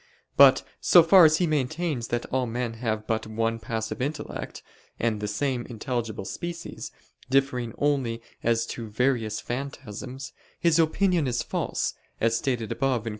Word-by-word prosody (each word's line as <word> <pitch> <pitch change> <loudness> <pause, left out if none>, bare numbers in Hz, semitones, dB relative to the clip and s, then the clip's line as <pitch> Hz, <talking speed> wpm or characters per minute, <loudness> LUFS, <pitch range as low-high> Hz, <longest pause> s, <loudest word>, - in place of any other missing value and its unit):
But - - +7 0.2
so 175 - +7
far 175 +1 +8
as 155 0 +5
he 180 - +2
maintains 150 -3 -1
that 120 0 -2
all 130 -1 +1
men 120 0 -2
have 110 -3 -1
but 110 0 -1
one 115 +1 -1
passive 110 +1 -4
intellect, 145 +4 -4 0.4
and 110 -3 0
the 105 - -2
same 125 +3 -1
intelligible 115 -4 -4
species, 170 - -6 0.4
differing 130 -4 +1
only 135 -6 0 0.2
as 115 0 +1
to 115 -2 -7
various 115 -1 0
phantasms, 130 0 -6 0.3
his 170 -1 +3
opinion 165 -1 +2
is 125 -1 -1
false, - - -2 0.3
as 115 0 +2
stated 120 -4 -1
above 130 -5 0
(Q. 115 - -3
125 Hz, 150 wpm, -26 LUFS, 115-145 Hz, 0.4 s, far